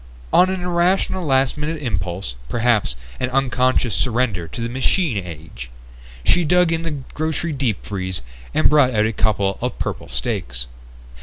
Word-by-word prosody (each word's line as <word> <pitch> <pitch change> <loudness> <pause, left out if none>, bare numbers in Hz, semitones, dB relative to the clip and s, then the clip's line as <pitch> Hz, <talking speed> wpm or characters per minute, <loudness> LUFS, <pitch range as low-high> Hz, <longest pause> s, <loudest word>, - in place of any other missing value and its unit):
On 185 - +6
an 190 -1 -2
irrational 180 +1 +1
last 135 -2 +2
minute 155 +2 -2
impulse 95 - -3 0.2
perhaps 115 - +2 0.2
an 125 - 0
unconscious 130 -3 +2
surrender 110 -4 +1
to 80 - -8
the 115 - -1
machine 130 - +1
age 75 -8 -9 0.5
she 175 - +4
dug 180 +1 +4
in 165 0 0
the 165 -3 -3 0.2
grocery 160 +1 -1
deep 130 -8 -1
freeze 95 -6 -3 0.3
and - - +4
brought 140 -5 +4
out 105 0 +3
a 110 - 0
couple 100 -3 +1
of - - -2
purple - - -4
steaks. - - -2
125 Hz, 155 wpm, -21 LUFS, 95-155 Hz, 0.5 s, On